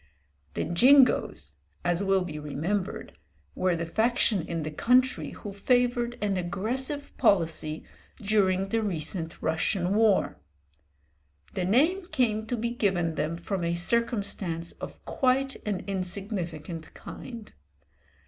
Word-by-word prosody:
The - - 0
"Jingos," 255 +9 +4 0.3
as 175 +1 +1
will 195 -1 +2
be 155 -4 -6
remembered, 160 +7 -3 0.4
were 185 -1 +1
the 170 0 -2
faction 220 +2 +2
in 165 0 -4
the 155 - -4
country 245 - +2
who 205 +6 -8
favoured 245 +2 +1
an 200 -2 +1
aggressive 240 +11 -3
policy 160 -4 +1 0.4
during 195 -2 +2
the 225 +2 +1
recent 170 -3 -2
Russian 180 +3 0
war. 215 -2 +3 1.2
The 180 - -1
name 320 - +3
came 220 - 0
to 245 - -1
be 235 +1 -1
given 190 -8 0
them 155 +1 -1
from 175 +2 -3
a 170 0 0
circumstance 200 -4 0
of - - -10
quite 270 +1 +1
an 200 -4 -1
insignificant 180 -4 -4
kind. 235 -4 -9
195 Hz, 120 wpm, -28 LUFS, 170-235 Hz, 1.2 s, Jingos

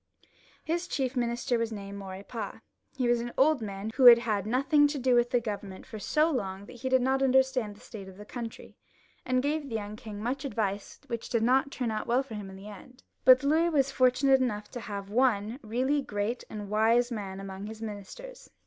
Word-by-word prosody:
His 340 +3 -2
chief 265 -4 -2
minister 240 0 0
was 230 0 -1
named 200 -1 -7
Maurepas; 195 +4 -7 0.4
he 255 -2 +1
was 240 -1 +2
an 240 0 -5
old 290 -1 +4
man 200 0 -5
who 260 - +3
had 240 -1 +12
had 210 -4 -1
nothing 275 +5 +4
to 290 0 -3
do 255 -1 +2
with 240 0 +3
the 245 - +2
Government 205 -4 -6
for 220 - -8
so 305 +9 +2
long 195 -7 -3
that 245 - -12
he 260 +2 -3
did 260 -1 +3
not 265 +1 +1
understand 260 -5 +2
the - - -18
state 200 -4 -9
of 190 - -14
the 210 - -10
country, 230 0 -8 0.5
and 255 0 +1
gave 295 0 -1
the 225 - -4
young 210 -1 -4
Ving 215 -3 -8
much 250 +5 -2
advice 205 -6 -3
which 235 -1 -5
did 230 -2 +1
not 265 +3 +3
turn 250 -4 -3
out 215 - -3
well 245 +3 +2
for 265 - -11
him 205 -2 -6
in 190 - -10
the 195 +2 -11
end. 210 +5 -13 0.2
But 255 +1 +8
Louis 320 +4 +3
was 275 -4 +2
fortunate 265 +1 +4
enough 210 -5 -2
to 245 - -6
have 200 -3 -6
one 230 -1 +1
really 255 +6 0
great 210 0 -3
and 210 -2 -6
wise 230 +3 +3
man 195 -4 -5
among 195 +1 -7
his 220 0 -8
ministers. 225 - -8
235 Hz, 215 wpm, -29 LUFS, 210-260 Hz, 0.5 s, had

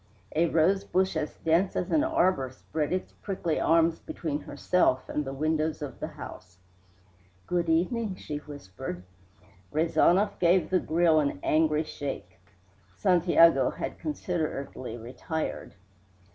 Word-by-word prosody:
A 165 +2 +3
rosebush 185 +3 +2
as 155 -1 -2
dense 170 +4 +2
as - - -2
an 305 -2 +3
arbor 185 - +2
spread 150 +4 -4
its 185 0 -2
prickly 185 -5 -2
arms 165 0 +3
between 150 -3 -4
herself 145 -2 +1
and 150 - -2
the 135 - -5
windows 155 +2 0
of 140 - -7
the - - -3
house. 90 -1 -10 0.9
"Good 175 -2 0
evening," 190 +5 +1
she 150 -5 -6
whispered. 130 -9 -8 0.7
Rezanov 170 +6 +2
gave 175 +1 +3
the 185 - +4
grill 165 -1 +3
an 140 -10 -1
angry 155 0 +2
shake. 135 - -6 0.6
(Santiago 170 - +4
had - - -5
considerately 155 - -4
retired.) 130 +7 -5
160 Hz, 125 wpm, -28 LUFS, 145-180 Hz, 0.9 s, the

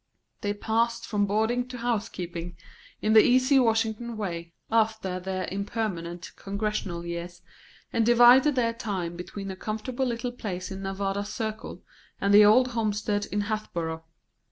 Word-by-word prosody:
They 205 0 -1
passed 230 +2 0
from 205 -1 0
boarding 220 +4 +1
to 255 -1 -7
house 235 -3 -1
keeping, 175 -1 -6 0.5
in 215 - +3
the 220 - +9
easy 255 +4 +4
Washington 225 -1 0
way, 170 -5 -4 0.2
after 220 -5 +1
their 185 0 -3
impermanent 190 -4 -4
Congressional 200 -4 -3
years, 170 +1 -6 0.5
and 230 - +2
divided 245 +5 +6
their 230 -2 +1
time 190 -7 -4
between 195 +3 -6
a - - -6
comfortable 220 +6 -3
little 240 0 -2
place 190 -6 -5
in 190 0 -6
Nevada 195 +1 -2
Circle 220 +1 -5 0.4
and 200 0 +2
the 210 +1 +9
old 245 +5 +6
homestead 210 -3 -1
in 205 - 0
Hatboro'. 175 -7 -3
210 Hz, 145 wpm, -27 LUFS, 190-230 Hz, 0.5 s, the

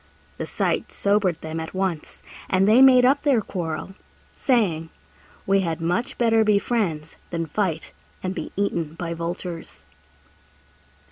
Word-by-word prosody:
The - - -3
sight - - -1
sobered 200 -4 +1
them 160 +1 -5
at 160 +3 -6
once, 185 -5 -3 0.3
and 190 +1 +3
they 225 +5 +6
made 255 -2 +7
up 275 +3 +4
their 280 -6 +3
quarrel, 175 -3 -4 0.4
saying, 180 - +1 0.6
"We 195 0 +3
had 170 -3 -2
much 175 +8 -1
better 225 -2 +4
be 210 -1 +4
friends 185 -9 -2
than 165 -1 -2
fight 165 -1 -2 0.3
and 185 0 -2
be - - -6
eaten 170 -6 -1
by 170 -1 -4
vultures." 170 0 -6
185 Hz, 140 wpm, -23 LUFS, 165-215 Hz, 0.6 s, made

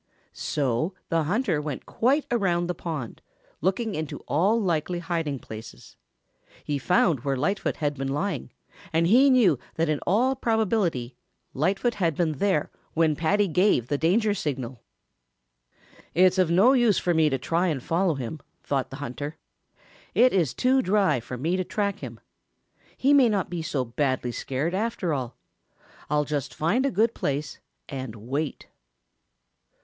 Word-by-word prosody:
So 145 +5 -1
the 165 -2 +1
hunter 185 - 0
went 150 -4 -5
quite 275 +6 +1
around 180 -7 +1
the 180 - -2
pond, 155 -10 -6 0.4
looking 195 +5 0
into 155 -4 -4
all 195 +10 +2
likely 175 -3 0
hiding 165 -4 -2
places. 110 -2 -11 0.7
He 145 -1 -2
found 170 -1 +2
where 135 +2 -1
Lightfoot 190 +10 -1
had 145 -2 -1
been 135 -1 -4
lying, 150 +2 -2 0.4
and 165 +1 +2
he 250 +10 +6
knew 215 - +4 0.2
that 165 0 0
in 150 -2 +1
all 245 +8 +3
probability 210 - 0 0.4
Lightfoot 195 - +1
had 170 -7 0
been 155 -4 -1
there 190 -7 +1 0.2
when 160 -1 +3
Paddy 195 +7 +2
gave 180 - +2
the 145 - +1
danger 205 +7 +2
signal. 135 - -4 1.3
"It's 185 +2 +4
of 180 -3 +3
no 195 +10 +5
use 240 -7 +4
for 175 - +1
me 160 -2 +4
to 135 - 0
try 170 +7 0
to 145 - -2
follow 165 +5 0
him," 135 +4 -5 0.2
thought 135 -2 -1
the 135 - -8
hunter. 145 +5 -6 0.8
"It 250 +2 +5
is 160 -10 +1
too 260 +1 +3
dry 195 - +2
for 125 +2 -7
me 165 +8 0
to 185 - 0
track 200 +1 -2
him. - - -8 0.8
He 275 +2 +3
may 265 -4 +6
not 200 -4 -1
be 175 -2 -3
so 145 -5 -2
badly 130 0 -1
scared, 135 +8 -2
after 200 -4 -1
all. 130 -4 -4 0.7
I'll 150 0 +2
just 145 -2 -3
find 225 - +1
a - - +1
good 225 -1 +2
place 145 +2 -3 0.3
and 130 -5 -6
wait." 135 +7 -4
165 Hz, 155 wpm, -26 LUFS, 145-200 Hz, 1.3 s, he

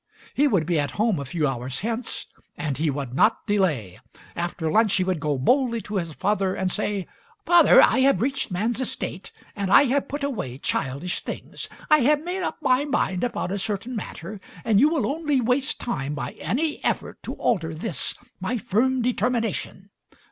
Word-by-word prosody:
He 290 +2 +3
would 190 - +2
be 170 -1 +1
at 145 - 0
home 215 -5 +2
a 140 - -4
few 150 +3 0
hours 130 -1 -3
hence, 230 +3 -3 0.3
and 145 -3 -2
he 155 +3 0
would 135 -3 -4
not 210 - +3
delay. 155 - 0 0.4
After 170 -2 -2
lunch 215 +1 +4
he 185 - +2
would 185 -3 -1
go 145 -1 -1
boldly 235 - +2
to 210 -1 -3
his 170 -3 -2
father 195 +1 0
and 185 -1 -1
say: 205 -2 -2 0.4
"Father, 345 -2 +7
I 245 - +4
have 265 -7 +4
reached 265 +4 -1
man's 220 +7 -1
estate 195 -6 -4 0.2
and 200 -2 -2
I 280 - +8
have 275 +1 +1
put 290 +1 -4
away 210 - -3
childish 140 +6 -2
things. - - -6 0.2
I 305 - +6
have 295 +3 +3
made 360 +2 -3
up - - -3
my 260 0 +3
mind 270 -11 0
upon 240 -6 -2
a 200 - -1
certain 210 +5 -3
matter 195 -1 -6 0.2
and 215 -3 +4
you 290 +5 +6
will 315 -3 0
only 295 -1 0
waste 250 +3 +1
time 145 - -3
by 125 -3 -4
any 300 +5 -2
effort - - -2
to - - -5
alter 165 -8 0
this, 175 - -2 0.2
my 190 +7 -1
firm 245 +5 +1
determination. 230 -5 -1
210 Hz, 185 wpm, -24 LUFS, 170-255 Hz, 0.4 s, I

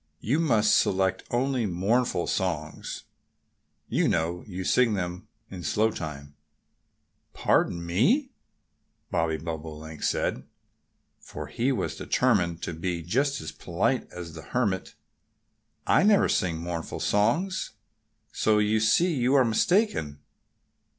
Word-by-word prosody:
"You 135 - 0
must 115 -10 +3
select 95 0 +1
only 125 -1 0
mournful 95 +2 +1
songs.... 80 -5 -3 0.8
You - - +1
know 85 +2 0
you 95 -2 -5
sing 115 +2 +3
them 90 -1 -4 0.2
in 95 -2 -7
slow 110 +6 +1
time." 70 -5 -7 1.0
"Pardon 85 0 +1
me!" 220 - +2 0.8
Bobby 80 -2 0
Bobolink 80 -1 -7
said, - - -1 0.8
for - - -8
he 125 +4 -1
was 130 - -2
determined 90 -10 +1
to 85 - -3
be 85 +1 -3
just 135 - 0
as 80 -1 -6
polite - - -1
as 85 -2 -8
the 80 - -8
Hermit. 100 +2 -2 0.9
"I - - +4
never 205 +1 +5
sing 85 -3 0
mournful 85 0 -5
songs. 125 - 0 0.6
So 110 -1 +2
you 105 +1 +2
see 165 +11 +3
you 130 0 +2
are 130 -2 +5
mistaken." 115 - +1
95 Hz, 120 wpm, -27 LUFS, 85-125 Hz, 1.0 s, never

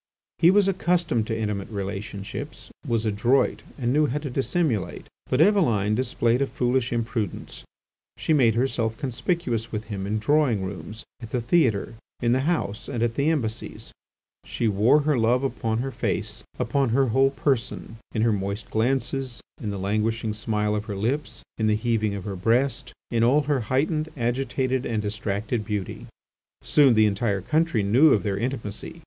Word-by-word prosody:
He 170 - +6
was 200 +1 +4
accustomed 175 - +1
to 110 - -2
intimate 105 -3 -3
relationships, 100 +5 -6 0.2
was 115 -2 0
adroit, 110 +6 +2 0.2
and 125 -1 0
knew 150 +1 +3
how 140 - -2
to 145 -3 -4
dissimulate; 135 - -1 0.2
but 130 - +1
Eveline 150 - +3
displayed 120 +1 +1
a 140 - +2
foolish 125 -1 0
imprudence: 115 -3 -3 0.5
she 160 - +1
made 120 -7 +4
herself 115 -3 0
conspicuous 125 -3 -2
with 105 -1 -3
him 95 -1 -4
in 110 +2 0
drawing 120 -3 +2
rooms, 100 +3 -7 0.2
at 115 - -8
the 125 - -1
theatre, 120 - +1 0.3
in 120 - +1
the 130 +5 +2
House, 105 -11 -2
and 120 -4 -1
at 115 -1 +1
the 140 +6 +1
Embassies; 120 -9 -3 0.5
she 115 - -2
wore 110 +8 +4
her 145 -3 +1
love 120 +3 +2
upon 115 -4 -1
her 135 - -3
face, - - -3 0.2
upon 140 -3 +1
her 130 +2 +2
whole 135 +4 +4
person, 135 -4 -2
in 110 - 0
her 115 -1 +3
moist 100 +2 -4
glances, 130 +2 0 0.2
in 105 - -3
the 100 - -3
languishing 110 +3 -1
smile 105 -1 -1
of 105 0 -2
her 105 - -5
lips, 125 +10 -2 0.2
in 110 - +2
the 105 - +3
heaving 110 -2 0
of 100 - -5
her 100 -1 -4
breast, 120 +6 +1 0.2
in 115 -1 +2
all 135 +6 +4
her 145 -1 0
heightened, 155 +4 +1
agitated, 130 +1 -1
and 110 -4 -2
distracted 105 +2 -2
beauty. 105 -3 -4 0.6
Soon 140 -5 +5
the 110 0 +5
entire 100 -1 0
country 155 - +1
knew 130 +10 +5
of 105 - +1
their 100 -3 -1
intimacy. 115 -4 -4
115 Hz, 170 wpm, -25 LUFS, 105-135 Hz, 0.6 s, He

